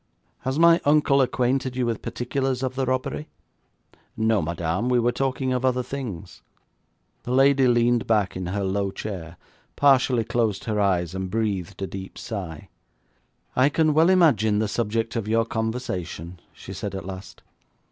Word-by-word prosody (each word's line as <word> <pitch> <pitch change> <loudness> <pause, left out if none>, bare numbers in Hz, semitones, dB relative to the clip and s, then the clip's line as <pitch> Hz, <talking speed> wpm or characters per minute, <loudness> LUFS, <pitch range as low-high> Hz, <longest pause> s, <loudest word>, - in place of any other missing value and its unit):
'Has 130 +2 -2
my 170 +1 +6
uncle 145 -2 +4
acquainted 130 0 0
you 125 -1 0
with 115 -2 -2
particulars 130 +2 -2
of 130 -1 -1
the 130 -1 -2
robbery?' 130 +4 -2 0.9
'No, 110 -1 +2
madame, 85 +7 -2
we 125 - +3
were 120 +1 +2
talking 130 0 -1
of 125 0 -1
other 125 -1 +1
things.' 125 -9 -7 0.8
The - - -9
lady 135 0 +5
leaned 120 -1 +2
back 105 -4 +1
in 90 -1 -4
her 100 +2 -2
low 100 +1 0
chair, 90 -4 -7 0.4
partially 130 -4 +4
closed 110 -3 -1
her 105 -2 -1
eyes, 90 -4 +1
and 95 0 -4
breathed 100 -3 -2
a - - 0
deep 95 +1 -8
sigh. 90 -9 -6 0.9
'I 130 +2 +4
can 155 0 +2
well 160 +3 +5
imagine 125 - +4
the 110 +1 +1
subject 115 +2 -2
of 115 -3 -2
your 115 +1 +2
conversation,' 95 -7 -4
she - - -10
said 100 -2 -5
at 95 -2 -6
last. 95 -1 -9
115 Hz, 160 wpm, -24 LUFS, 95-130 Hz, 0.9 s, my